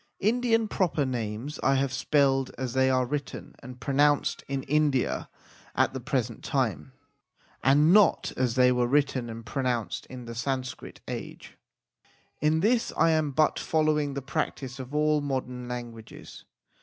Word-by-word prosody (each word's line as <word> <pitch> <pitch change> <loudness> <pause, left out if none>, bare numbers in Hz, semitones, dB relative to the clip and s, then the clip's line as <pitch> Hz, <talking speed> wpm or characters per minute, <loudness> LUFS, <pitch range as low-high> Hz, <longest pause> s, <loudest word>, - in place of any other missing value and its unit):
Indian 225 +1 +2
proper 175 -8 0
names 120 +2 -4
I 135 - +3
have 135 -1 0
spelled 135 -2 +2
as 130 -2 -3
they 130 0 +3
are 130 -1 +2
written 140 +1 -5
and 125 0 -10
pronounced 145 +1 +2
in 135 -1 -3
India 150 -3 0 0.5
at - - +2
the 130 - -4
present 125 -4 -2
time, 130 -2 -1 0.7
and 145 +5 +5
not 210 -1 +4
as 125 -2 0
they 125 -1 +5
were 125 -1 +1
written 135 -3 +1
and 115 0 -8
pronounced 125 -2 -2
in 125 -2 -9
the 115 - -7
Sanskrit 130 +2 -4
age. - - -7 0.8
In 155 +2 +2
this 230 +4 +2
I 165 - +4
am 155 -2 +1
but 150 +3 +2
following 150 -3 +1
the 140 - -4
practice 135 -3 -3
of 130 +2 -7
all 150 0 +2
modern 125 -3 -4
languages. 120 -2 -8
135 Hz, 150 wpm, -27 LUFS, 125-150 Hz, 0.8 s, and